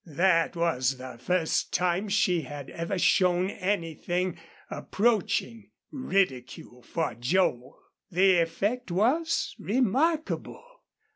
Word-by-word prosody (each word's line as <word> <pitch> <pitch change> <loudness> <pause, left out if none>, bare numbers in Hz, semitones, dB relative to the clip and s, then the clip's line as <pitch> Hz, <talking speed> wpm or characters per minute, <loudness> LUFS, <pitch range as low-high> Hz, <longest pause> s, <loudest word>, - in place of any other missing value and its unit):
That 165 +2 +2
was 135 -6 0
the 125 -2 -9
first 165 +5 0
time 180 +3 0
she 195 -4 +2
had 145 -1 -8
ever 170 +4 -3
shown 180 +1 +3
anything, 180 -2 -2 0.3
approaching 220 0 -1 0.2
ridicule 135 - -2
for 165 +5 -3
Joel. 125 -1 0 0.3
The 185 0 +4
effect 200 +9 -1
was 265 - +1
remarkable. 270 - 0
180 Hz, 95 wpm, -27 LUFS, 165-205 Hz, 0.3 s, The